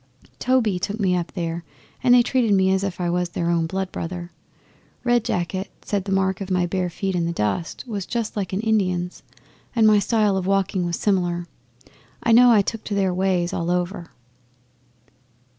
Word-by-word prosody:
Toby 230 -8 +2
took 205 +4 -3
me 185 -3 +2
up 175 -1 -2
there, 170 -2 -3 0.4
and 245 -1 +6
they 245 - +6
treated 235 -5 +2
me 190 0 +3
as 190 0 0
if 195 -3 -3
I 175 - -1
was 180 0 0
their 170 0 -1
own 165 -1 +1
blood 190 +2 -3
brother. 175 +1 -5 0.7
Red 240 -2 +2
Jacket 185 -3 -2
said 200 -2 -2
the 195 - -4
mark 190 0 +1
of 195 - -5
my 180 -1 +2
bare 180 0 -1
feet 190 +2 -3
in 170 -1 0
the - - -1
dust 165 +4 -2
was 205 -5 -4
just 230 -3 -3
like 200 -3 -3
an 190 +2 -1
Indian's 185 -5 0 0.5
and 225 -2 +4
my 215 -1 +6
style 210 -1 +2
of 185 -1 -2
walking 195 -2 +1
was 170 - -1
similar. 175 -3 0 0.8
I 235 - +2
know 245 +2 +7
I 210 -3 +5
took 225 +2 -4
to 205 - -2
their 190 -2 +1
ways 180 -1 0
all 170 0 -2
over. 180 0 -2
190 Hz, 195 wpm, -23 LUFS, 175-210 Hz, 0.8 s, know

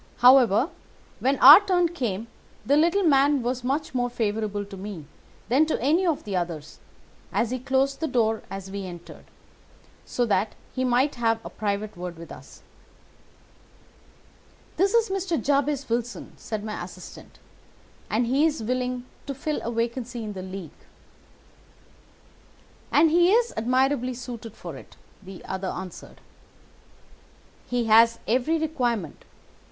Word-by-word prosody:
However, 250 - +5 0.5
when 270 +2 +1
our 285 +7 +11
turn 360 -3 +2
came 230 - -3 0.4
the 280 - +3
little 340 +6 +3
man 280 -3 +3
was 245 +1 -2
much 275 +4 -2
more 245 -1 0
favourable 215 -3 -2
to 200 0 -10
me 190 -5 -7 0.4
than 270 +7 +3
to 315 - -1
any 320 +9 +2
of 320 -4 0
the 200 -2 -4
others, 170 -4 -4 0.5
and 235 - +1
he 255 +3 -3
closed 270 +2 0
the 320 - -1
door 225 -5 +1
as 195 0 -7
we 200 0 -5
entered, 175 -1 -11 0.8
so 245 - -1
that 205 -1 0 0.2
he 260 - -1
might 255 +3 +2
have 225 -1 +2
a - - -7
private 210 0 -3
word 175 -1 -7
with 165 0 -11
us. - - -13 2.1
"'This 390 +4 +2
is 460 -2 +3
Mr. 370 -4 -1
Jabez 280 -1 0
Wilson,' 235 -3 -3
said 215 -2 -6
my 215 -1 -5
assistant, - - -12 0.7
'and 235 +3 +1
he 265 +5 +2
is 300 -7 -3
willing 250 +1 -2 0.2
to 275 - -4
fill 300 +3 -3
a 235 - -4
vacancy 235 0 -3
in 210 -1 -5
the 190 - -6
League.' 185 -3 -7 2.2
"'And 310 +2 +5
he 345 +2 +5
is 470 +2 +3
admirably 255 +2 +1
suited 235 -3 -8
for - - -8
it,' - - -14 0.3
the 190 -2 -11
other 190 0 -4
answered. 185 -1 -8 1.5
'He 245 -1 0
has 230 +1 +5
every 260 +8 +1
requirement. 245 - -2
245 Hz, 145 wpm, -25 LUFS, 210-280 Hz, 2.2 s, our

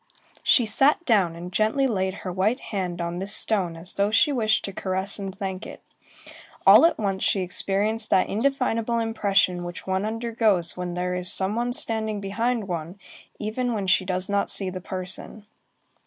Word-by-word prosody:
She 245 - +4
sat 275 +10 +3
down, 195 - +2
and 175 +2 -8
gently 220 +7 +2
laid 190 -6 0
her 185 - -2
white 200 +8 0
hand 185 -5 -4
on 170 +1 -3
this 200 +3 -1
stone 185 -6 0
as 170 +3 -7
though 200 +1 +1
she 225 +8 +3
wished 220 -5 +1
to 195 - -6
caress 190 +2 -2
and 195 -1 -4
thank 190 0 -5
it. - - -11 0.8
All 330 - +9
at - - -2
once, 195 -3 -2
she 195 - +1
experienced 205 +4 -1
that 185 - +3
indefinable 235 -1 0
impression 200 -5 +1
which 175 0 -7
one 190 +1 -1
undergoes 220 -5 0
when 180 -1 -5
there 180 0 -2
is 180 0 +5
some 190 +2 +2
one 240 +1 -1
standing 220 -5 -1
behind 225 +2 -2
one, 170 +1 -5 0.4
even 240 +3 -2
when 200 -2 -2
she 185 0 +3
does 185 0 -2
not 200 0 0
see 190 -2 -1
the 185 0 -6
person. 185 +3 -5
200 Hz, 180 wpm, -24 LUFS, 185-225 Hz, 0.8 s, All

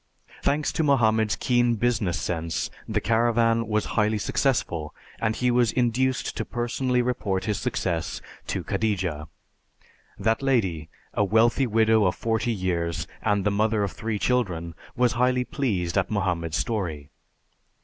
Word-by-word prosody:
Thanks 150 +1 +1
to 160 - 0
Mohammed's 110 -6 +3
keen 120 0 +2
business 105 -6 0
sense 80 -1 -2 0.2
the 110 -1 0
caravan 115 +1 +2
was 110 -1 0
highly 110 0 +2
successful, 100 - -1 0.2
and 110 0 0
he 125 0 +1
was 120 -2 +3
induced 125 +1 0
to - - -1
personally 125 +1 -1
report 105 -6 -1
his 105 -3 -1
success 95 -8 -2 0.3
to - - -2
Khadija. 90 -8 -1 0.9
That 110 +2 +1
lady, 95 - 0 0.2
a - - +2
wealthy 115 +6 +3
widow 110 -1 +3
of 90 - +1
forty 115 +1 0
years, 85 -5 -1 0.2
and 105 -2 +1
the 105 - +3
mother 105 +1 +1
of 100 - -2
three 110 -2 -3
children, 90 -9 0 0.2
was 125 -1 +3
highly 125 +1 +2
pleased 100 - -1
at 95 - -2
Mohammed's 90 -6 -1
story. 80 -3 -3
110 Hz, 140 wpm, -25 LUFS, 95-120 Hz, 0.9 s, Mohammed's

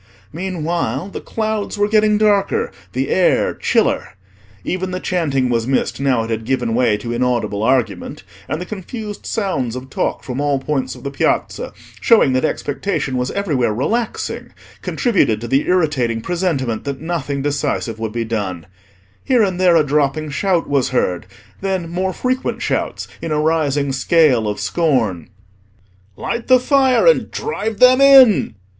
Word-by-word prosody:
Meanwhile 170 - -3
the - - -7
clouds 220 -2 -3
were 205 0 +2
getting 215 0 +3
darker, 205 -2 +1 0.2
the 130 +2 -1
air 185 - +2
chiller. - - 0 0.5
Even 185 +1 -2
the 185 0 -3
chanting 150 -9 0
was 115 -1 0
missed 135 -1 0
now 130 -5 +2
it 115 - -5
had 110 0 -2
given 120 -1 -1
way 120 -3 +2
to 115 +3 -5
inaudible 120 -4 -1
argument; 115 -6 -1 0.3
and 155 - -2
the 180 - -5
confused 210 +2 -7
sounds 160 - -2
of 130 +1 -8
talk - - -2
from 130 +2 -4
all 145 -1 +1
points 135 -1 -2
of - - -13
the 140 - -4
Piazza, 140 - -1 0.3
showing 220 - +4
that 130 - +1
expectation 145 -2 -2
was 125 0 -1
everywhere 150 - 0
relaxing, 225 - -2 0.3
contributed 190 - +1
to 120 - -6
the 135 +4 +1
irritating 145 -10 +1
presentiment 140 -7 -2
that 140 -2 -4
nothing 145 -4 -3
decisive 140 -6 -2
would 110 -1 -3
be 115 +1 -3
done. 100 -7 -3 0.6
Here 250 -4 +3
and 185 -3 -1
there 180 -2 +5
a 160 - +5
dropping 145 +1 0
shout 180 +3 0
was 140 -3 +1
heard; 90 -9 -1 0.3
then, 190 -3 -2
more 185 +2 -1
frequent 255 +6 -2
shouts - - -2
in 165 - -4
a 150 - +1
rising 150 -3 +1
scale 135 -4 +3
of 105 0 -3
scorn. 105 - 0 0.9
"Light 235 0 -4
the 255 -1 +6
fire 265 - +3
and - - +4
drive 225 - -4
them 255 +1 +6
in!" 265 - +6
145 Hz, 160 wpm, -18 LUFS, 125-190 Hz, 0.9 s, the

